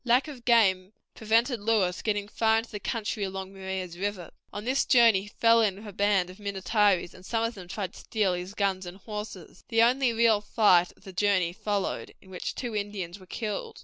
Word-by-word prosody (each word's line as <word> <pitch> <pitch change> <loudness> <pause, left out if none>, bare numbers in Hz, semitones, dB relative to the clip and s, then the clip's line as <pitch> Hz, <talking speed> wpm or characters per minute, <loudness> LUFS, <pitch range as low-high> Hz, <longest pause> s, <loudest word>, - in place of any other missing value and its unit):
Lack 250 +4 +3
of 265 -6 -10
game 200 -5 +3 0.2
prevented 230 +3 +1
Lewis 200 -4 +1
getting 205 -2 -1
far 220 +1 +2
into 225 +1 -4
the 210 - -5
country 215 -1 -3
along 190 0 -5
Maria's 190 -2 -5
River. 200 -3 -3 0.2
On 205 +1 -6
this 260 +3 +2
journey 230 -6 +5
he 205 - -11
fell 230 +2 +4
in 205 -4 +1
with 205 +3 -12
a 205 - -8
band 195 -2 +1
of 185 - -15
Minnetarees, 200 -2 +1
and 185 - -15
some 225 +3 -1
of 230 +1 -1
them 185 -5 -11
tried 190 0 -5
to - - -12
steal 210 -5 0
his 180 +3 -5
guns 190 -3 -1
and 175 +2 -9
horses. 210 -3 -8
The 225 -1 +3
only 250 +1 +3
real 225 -2 +3
fight 185 -5 +3
of - - -24
the 190 - -10
journey 185 -3 +1
followed, 205 -1 -3
in 190 - -18
which 180 - -5
two 240 -4 -4
Indians 200 -3 -4
were 185 - -16
killed. 210 0 -5
205 Hz, 210 wpm, -27 LUFS, 190-225 Hz, 0.2 s, journey